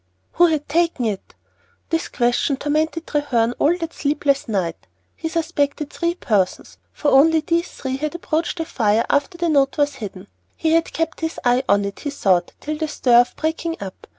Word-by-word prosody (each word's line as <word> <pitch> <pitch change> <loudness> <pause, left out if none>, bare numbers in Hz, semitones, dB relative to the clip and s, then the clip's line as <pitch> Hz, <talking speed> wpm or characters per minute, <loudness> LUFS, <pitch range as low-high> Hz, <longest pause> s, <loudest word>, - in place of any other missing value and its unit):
Who 350 +1 +5
had 310 -3 -1
taken 330 -4 +1
it? 205 -3 -4 0.6
This 330 0 0
question 245 +3 +1
tormented 315 +3 -1
Treherne 245 -6 0
all 335 +4 +3
that 330 -2 -5
sleepless 285 -1 0
night. 185 -7 -2 0.3
He 325 - -4
suspected 295 -3 -1
three 340 0 -1
persons, 205 - -1
for 295 - 0
only 320 +4 +6
these 335 +2 -2
had 275 +4 -3
approached 340 0 -2
the 325 - -2
fire 225 -4 +1
after 285 +5 0
the 345 0 0
note 280 -4 +2
was 290 -2 +1
hidden. 200 -6 -7 0.3
He 320 - +1
had 330 0 +2
kept 325 0 -2
his 320 0 -3
eye 245 +1 +4
on 200 0 +4
it, 200 - -6
he 290 - -4
thought, 190 -11 +1
till 305 +1 -4
the 315 - -1
stir 245 -5 +5
of 245 - -4
breaking 330 +1 -2
up. 190 -2 -9
290 Hz, 180 wpm, -21 LUFS, 245-325 Hz, 0.6 s, only